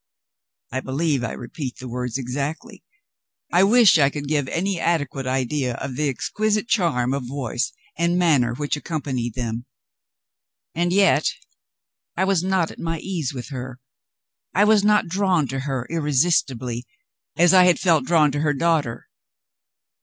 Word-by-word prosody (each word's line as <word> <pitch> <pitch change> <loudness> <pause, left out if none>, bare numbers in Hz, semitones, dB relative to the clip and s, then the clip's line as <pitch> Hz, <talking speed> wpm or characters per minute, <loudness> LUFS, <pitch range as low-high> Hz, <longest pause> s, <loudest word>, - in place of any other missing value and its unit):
I 130 - -2
believe 140 0 -1
I 120 - -3
repeat 125 +2 -6
the 130 - -8
words 125 0 -3
exactly. 140 +4 -5 0.7
I 180 +2 +5
wish 210 -4 +6
I 140 -2 +5
could 145 0 -6
give 145 -2 0
any 185 +3 -1
adequate 145 -6 -1
idea 130 0 -1
of 130 - -5
the 150 +1 0
exquisite 215 - -1
charm 145 - +1
of 140 -3 -3
voice 125 -2 -3 0.3
and 170 +1 +2
manner 140 -10 +2
which 145 +2 -2
accompanied 135 -7 -4
them. 120 -1 -4 1.1
And 175 +1 0
yet, 195 +2 +3 0.8
I - - +2
was 190 -3 +2
not 185 -3 +1
at - - -14
my 165 0 -2
ease 165 -5 -3
with 125 -5 -7
her 130 -1 -7 0.8
I 200 - +5
was 210 -1 +4
not 210 -1 +3
drawn 185 -4 +1
to 135 - -3
her 135 -3 -3
irresistibly, 135 -6 0 0.5
as 175 +1 +5
I 185 -1 +7
had 180 -1 +4
felt 165 -6 +3
drawn 155 -3 +3
to 145 - -2
her 150 -1 +1
daughter. 150 -6 0
145 Hz, 155 wpm, -22 LUFS, 130-175 Hz, 1.1 s, I